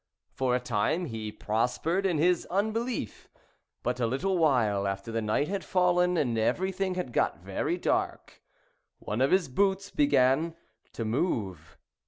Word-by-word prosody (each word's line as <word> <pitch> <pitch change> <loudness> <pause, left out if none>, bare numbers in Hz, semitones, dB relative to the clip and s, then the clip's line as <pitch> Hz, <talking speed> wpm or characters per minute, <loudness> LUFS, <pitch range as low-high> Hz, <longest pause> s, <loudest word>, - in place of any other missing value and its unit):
For 130 -2 +1
a - - +1
time 125 - 0
he 110 -6 -5
prospered 125 - 0
in 175 -4 0
his 175 +3 +2
unbelief; 220 - -2 0.5
but 125 +1 -1
a 120 - +1
little 180 +11 0
while 110 -10 +2
after 100 +3 -4
the 115 0 -1
night 110 +7 0
had 200 0 -3
fallen, 180 -1 +2
and 120 -7 +1
everything 190 - 0
had 180 -10 -4
got - - 0
very - - -2
dark, - - -2 0.6
one 105 +4 -3
of 135 - +4
his 185 -2 +3
boots 195 +7 0
began 160 - +3 0.4
to 115 - -4
move. 105 - -2
140 Hz, 150 wpm, -28 LUFS, 115-185 Hz, 0.6 s, of